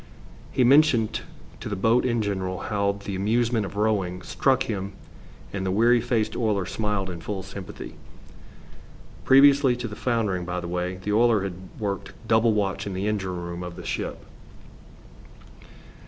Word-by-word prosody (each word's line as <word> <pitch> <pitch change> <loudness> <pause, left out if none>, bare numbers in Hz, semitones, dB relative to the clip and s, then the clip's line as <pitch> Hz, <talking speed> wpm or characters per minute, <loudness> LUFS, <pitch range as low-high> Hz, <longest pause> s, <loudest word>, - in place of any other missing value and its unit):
He 130 - +2
mentioned 130 -4 +4 0.4
to - - -6
the 105 - -2
boat 115 +6 +2
in 120 -3 +1
general 95 -2 -2 0.2
how 100 -1 +2
the 100 -1 -6
amusement 110 +2 +1
of - - -10
rowing 100 -4 0
struck 135 -2 +1
him, 100 -2 -4 0.6
and 100 -1 -2
the 95 - -1
weary 115 +5 +4
faced 115 -2 0
oiler 105 -5 0
smiled 105 -2 -2
in 85 -2 -7
full 95 +2 -4
sympathy. 95 0 -8 1.3
Previously 135 -1 +6
to 120 -1 -4
the 105 - -7
foundering, 110 -7 0
by 90 0 -3
the 90 - -6
way, 90 +1 -2
the 105 - -1
oiler 115 -2 +4
had 95 -2 -3 0.2
worked 100 -2 -4
double 110 0 +4
watch 100 -1 -1
in 95 - -4
the 95 +2 -2
engine 95 -4 -2
room 85 0 -5
of 90 -1 -6
the - - -9
ship. - - -3
105 Hz, 160 wpm, -25 LUFS, 95-115 Hz, 1.3 s, Previously